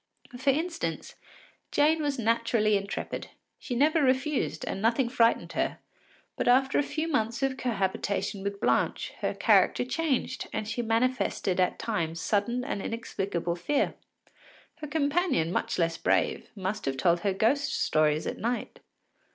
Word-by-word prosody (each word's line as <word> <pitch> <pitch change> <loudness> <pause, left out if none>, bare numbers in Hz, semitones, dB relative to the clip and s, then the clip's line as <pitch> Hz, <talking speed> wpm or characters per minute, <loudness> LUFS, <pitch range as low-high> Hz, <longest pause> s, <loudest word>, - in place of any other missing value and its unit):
For 260 +3 0
instance, 330 +5 -2 0.6
Jane 310 +2 +3
was 290 -2 -1
naturally 230 -2 +2
intrepid; 200 0 -3 0.3
she 250 - -4
never 305 +5 +3
refused, 265 +2 0
and 195 - -4
nothing 235 +3 +2
frightened 235 -2 +2
her, - - -1 0.6
but - - -2
after 265 +2 +4
a - - +5
few 310 +2 -2
months 235 -5 0
of 270 -1 +1
cohabitation 200 -4 -1
with 200 0 -4
Blanche - - 0
her - - -1
character - - +3
changed 280 0 -1
and 215 - -3
she 220 +3 -2
manifested 230 -5 0
at 180 - +2
times 170 -7 -2
sudden 225 +6 0
and 255 -7 -3
inexplicable 195 -7 -3
fear. 280 +12 0 0.8
Her 310 -2 -6
companion, 290 - +1
much - - -1
less 165 -1 +1
brave, - - +1
must 195 +1 -3
have 135 -1 -1
told 170 +5 +3
her 195 +3 0
ghost 235 +9 +1
stories 155 0 +2
at - - -4
night. 235 +2 -3
230 Hz, 145 wpm, -28 LUFS, 195-275 Hz, 0.8 s, a